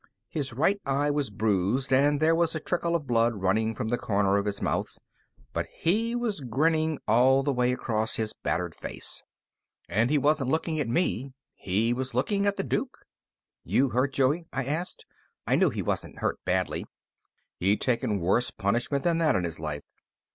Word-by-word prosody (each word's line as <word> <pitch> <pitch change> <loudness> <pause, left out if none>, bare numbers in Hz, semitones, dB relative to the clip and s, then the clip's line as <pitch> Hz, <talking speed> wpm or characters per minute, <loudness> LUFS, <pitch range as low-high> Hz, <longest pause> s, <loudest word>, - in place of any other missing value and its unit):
His 140 -5 -3
right 165 +11 +1
eye 140 +2 +1
was 145 -3 -1
bruised, 110 +5 0
and 145 +2 +4
there 160 +1 +4
was 165 -1 +1
a - - -1
trickle 170 +1 -1
of 160 -4 -1
blood 120 -2 +2
running 110 +3 0
from 110 - -3
the 120 - 0
corner 100 -1 +2
of 100 +1 -1
his 100 -1 -2
mouth, - - -2 0.6
but - - -2
he 225 +8 0
was 230 -9 -2
grinning 155 +5 +1
all 130 +5 +5
the 140 0 +1
way 125 0 +2
across 110 -3 0
his 110 -1 -2
battered - - -2
face. - - -6 0.7
And 110 +8 +1
he 150 - +3
wasn't 145 -2 +2
looking 160 +1 0
at 145 - 0
me; 135 -2 0 0.2
he 110 +5 0
was 130 0 -4
looking 200 - +1
at 200 - +1
the 195 - -1
Duke. 265 +5 -3 0.6
"You 135 0 +2
hurt, 130 +4 0
Joey?" 145 +6 +1
I 135 -1 -2
asked. 160 +6 -3 0.4
I - - +2
knew - - +4
he - - -3
wasn't - - -2
hurt - - -1
badly; 95 0 0 0.7
he'd 100 +3 +2
taken 115 -4 +1
worse 95 +8 +2
punishment 120 +7 -1
than 170 -1 +2
that 155 -5 +3
in 90 - +1
his 80 -2 -4
life. 75 -2 -4
130 Hz, 185 wpm, -27 LUFS, 110-155 Hz, 0.7 s, all